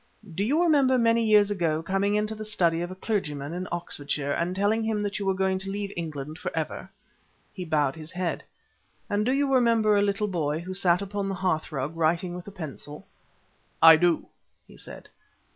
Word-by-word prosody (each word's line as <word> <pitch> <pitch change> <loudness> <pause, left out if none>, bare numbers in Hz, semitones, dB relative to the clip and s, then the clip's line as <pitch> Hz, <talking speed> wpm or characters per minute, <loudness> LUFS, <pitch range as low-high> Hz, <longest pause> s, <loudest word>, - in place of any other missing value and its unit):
Do 190 +5 -1
you 295 +10 +2
remember 280 -6 +4
many 230 -1 +3
years 210 -2 +4
ago 165 -5 0
coming 195 +3 0
into 210 +1 0
the 215 0 -7
study 170 -6 +1
of 175 - -3
a 185 - -7
clergyman 155 -8 -3
in 180 +1 -4
Oxfordshire 145 -4 -2
and 170 +5 -1
telling 205 +3 +1
him 220 -1 -1
that 205 0 -3
you 200 - -3
were 190 - +2
going 190 0 0
to 195 +1 -2
leave 200 0 -4
England 155 -1 -5
for 180 - -3
ever?" 160 +3 -4 0.6
He 185 -4 -6
bowed 150 -3 +1
his 155 -1 -9
head. 180 -1 -3 0.7
"And 205 +1 +1
do - - +3
you 275 0 +1
remember 230 -4 +4
a 200 - +4
little 205 +1 0
boy 155 -6 -1
who 185 +2 -6
sat 185 0 +2
upon 200 0 -3
the 195 - -2
hearthrug 155 -5 -2
writing 165 +2 0
with 180 +1 -8
a - - -7
pencil?" 150 -4 -8 0.7
"I 165 0 +10
do," 170 0 +2 0.4
he - - -16
said. - - -10
190 Hz, 195 wpm, -26 LUFS, 165-210 Hz, 0.7 s, I